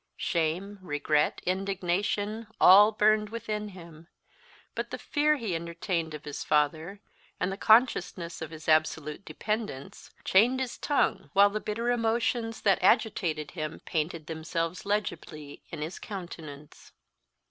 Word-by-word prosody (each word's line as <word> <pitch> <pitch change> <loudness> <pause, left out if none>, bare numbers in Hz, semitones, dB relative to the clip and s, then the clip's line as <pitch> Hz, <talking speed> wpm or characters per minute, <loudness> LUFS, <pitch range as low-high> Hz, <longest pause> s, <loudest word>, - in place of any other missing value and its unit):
Shame, 175 +5 -1
regret, 150 -3 0
indignation, 195 +3 -1
all 205 +4 +8
burned 215 0 +3
within 215 -2 -4
him; 170 -4 -12 0.7
but - - -4
the - - -5
fear 300 0 +1
he 225 -8 -3
entertained 170 -1 -3
of 150 - -10
his 145 -1 -5
father, 160 +6 0 0.4
and 180 - 0
the - - -3
consciousness 185 -7 +2
of 160 - -5
his 160 -1 -11
absolute 155 +1 +1
dependence, 210 - -5 0.2
chained 240 +7 +4
his 260 -1 -4
tongue, 290 - 0
while 200 0 +6
the 215 - -2
bitter 230 +3 -1
emotions 230 0 0
that 195 -2 +3
agitated 165 -7 +1
him 155 -2 -5
painted 160 0 -2
themselves 165 +4 -4
legibly 155 -8 -3
in 155 -2 -5
his 160 +4 -6
countenance. 160 -7 -9
185 Hz, 130 wpm, -28 LUFS, 160-215 Hz, 0.7 s, all